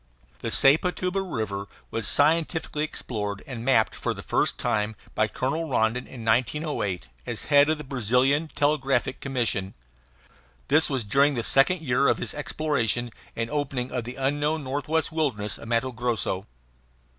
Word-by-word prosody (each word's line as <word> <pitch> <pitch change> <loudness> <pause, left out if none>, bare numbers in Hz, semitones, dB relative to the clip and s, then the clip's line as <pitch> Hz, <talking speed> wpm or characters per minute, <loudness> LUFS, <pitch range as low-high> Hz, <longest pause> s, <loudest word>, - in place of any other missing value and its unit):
The - - -3
Sepotuba 180 +6 +3
River 110 - -4 0.2
was 115 -2 0
scientifically 155 0 +2
explored 105 -9 -4
and 120 -4 -6
mapped 120 -4 +3
for - - -3
the - - -8
first - - +1
time 105 0 -1 0.2
by 110 - +2
Colonel 155 +8 -2
Rondon 120 0 +1
in 120 -4 -9
1908, 115 - 0 0.2
as - - -3
head 145 +1 +5
of 155 - +2
the 150 - -7
Brazilian 135 +4 +1
Telegraphic 135 -4 +1
Commission. 115 -8 -1 0.9
This 155 +2 +5
was 135 -4 -1
during 140 +7 +3
the 115 - -1
second 135 +9 +4
year 135 -2 +2
of - - +3
his - - -2
exploration 140 -6 -1 0.2
and 115 +1 -3
opening 135 -4 -2
of 125 -3 -3
the 120 +2 -6
unknown 145 +3 0
northwestern 150 +4 -1
wilderness 110 -10 0
of - - -10
Matto 120 +3 0
Grosso. 115 -5 -2
130 Hz, 150 wpm, -26 LUFS, 115-150 Hz, 0.9 s, head